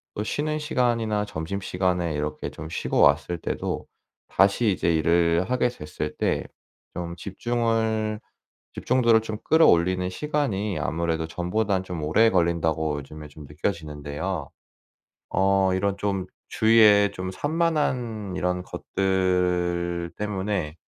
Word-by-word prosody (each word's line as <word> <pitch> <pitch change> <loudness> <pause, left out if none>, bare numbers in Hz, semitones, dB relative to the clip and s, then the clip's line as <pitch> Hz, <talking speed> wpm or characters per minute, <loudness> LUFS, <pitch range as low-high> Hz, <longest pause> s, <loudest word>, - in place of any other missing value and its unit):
또 105 - -2
쉬는 155 +6 -2
시간이나 115 -7 0
점심시간에 90 -1 -2
이렇게 75 0 -3
좀 75 - -8
쉬고 85 - -2
왔을 80 +5 +3
때도 - - -3 0.4
다시 100 +3 +3
이제 85 -2 +1
'일을 85 +4 +2
하게 125 -1 +2
됐을 75 -8 -6
때 - - 0 0.5
좀 85 -1 -4
집중을 110 +1 -1 0.5
집중도를 120 -3 +3
좀 110 -1 -5
끌어올리는 90 - +4
시간이 105 - -1
아무래도 80 +1 -1
전보단 95 +3 -1
좀 90 -3 -5
오래 110 +9 +4
걸린다'고 80 -4 +1
요즘에 75 +2 -10
좀 75 0 -12
느껴지는데요. 75 +2 -4 0.8
어 95 0 +3
이런 100 +1 0
좀 100 -2 -1 0.2
주위에 105 -2 +5
좀 95 0 -5
산만한 130 - -1
이런 90 0 -1
것들 90 -2 0
때문에 100 -6 -2
95 Hz, 265 characters per minute, -25 LUFS, 85-110 Hz, 0.8 s, 주위에